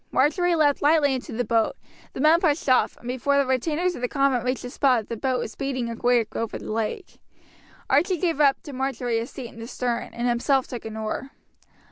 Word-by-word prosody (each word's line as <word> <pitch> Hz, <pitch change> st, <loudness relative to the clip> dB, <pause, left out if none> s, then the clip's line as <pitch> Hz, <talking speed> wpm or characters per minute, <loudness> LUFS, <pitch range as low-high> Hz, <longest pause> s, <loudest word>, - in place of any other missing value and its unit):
Marjory 345 Hz, +6 st, +2 dB
leapt 295 Hz, -3 st, +2 dB
lightly 290 Hz, -2 st, +4 dB
into 255 Hz, -, -5 dB
the 245 Hz, +2 st, -1 dB
boat; 225 Hz, -1 st, +1 dB, 0.4 s
the -, -, -7 dB
men 310 Hz, +4 st, +5 dB
pushed 305 Hz, -4 st, +1 dB
off, 255 Hz, -1 st, +3 dB
and 240 Hz, -, -12 dB
before 260 Hz, +3 st, +1 dB
the 280 Hz, -, +3 dB
retainers 305 Hz, +7 st, 0 dB
of 245 Hz, -, -8 dB
the 245 Hz, -, 0 dB
convent 275 Hz, -2 st, +1 dB
reached 255 Hz, +1 st, -2 dB
the 245 Hz, -, -6 dB
spot 250 Hz, -6 st, +2 dB
the 230 Hz, -, -3 dB
boat 255 Hz, +3 st, -1 dB
was 220 Hz, -, -4 dB
speeding 255 Hz, -2 st, -3 dB
away 240 Hz, 0 st, +2 dB
over 230 Hz, -1 st, -3 dB
the -, -, -7 dB
lake. 225 Hz, -, -4 dB, 0.7 s
Archie 340 Hz, +7 st, +2 dB
gave 330 Hz, -3 st, 0 dB
up 275 Hz, -2 st, +4 dB
to 290 Hz, -, -9 dB
Marjory 250 Hz, -3 st, -1 dB
his 230 Hz, -, -5 dB
seat 250 Hz, -4 st, -8 dB
in 230 Hz, -, -14 dB
the 225 Hz, -, -7 dB
stern, 245 Hz, -1 st, -2 dB
and 240 Hz, +1 st, -1 dB
himself 255 Hz, +3 st, +2 dB
took 240 Hz, -3 st, -7 dB
an 220 Hz, 0 st, -6 dB
oar. 220 Hz, +5 st, -4 dB
260 Hz, 215 wpm, -24 LUFS, 235-285 Hz, 0.7 s, men